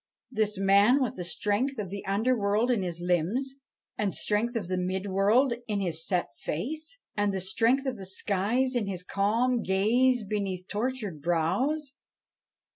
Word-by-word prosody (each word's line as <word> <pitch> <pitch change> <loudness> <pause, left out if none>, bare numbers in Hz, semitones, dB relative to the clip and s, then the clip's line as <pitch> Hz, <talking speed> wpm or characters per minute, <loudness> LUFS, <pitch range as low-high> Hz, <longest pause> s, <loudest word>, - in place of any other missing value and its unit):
this 215 -3 0
man 200 +7 +5
with 255 -4 -1
the 180 - -5
strength 210 +10 0
of 200 -4 -4
the 200 0 -5
under 220 +6 +2
world 210 +3 +1
in 230 -5 +1
his 175 -2 -3
limbs, 185 - -1 0.4
the 205 -2 +1
strength 220 +6 0
of 210 -6 -2
the 185 - -1
mid 185 +1 -2
world 205 +7 +3
in 210 -2 -1
his 165 -4 -1
set 175 -10 -1
face, 310 - -4 0.2
and 205 -1 +1
the 190 - -2
strength 230 +9 +2
of 260 -3 -2
the 195 - -7
skies 210 +7 0
in 225 -4 0
his 185 -2 -4
calm 230 +6 +1
gaze 235 +6 +2
beneath 195 -3 -3
tortured 210 - -3
brows? 250 - 0
205 Hz, 165 wpm, -28 LUFS, 190-250 Hz, 0.4 s, man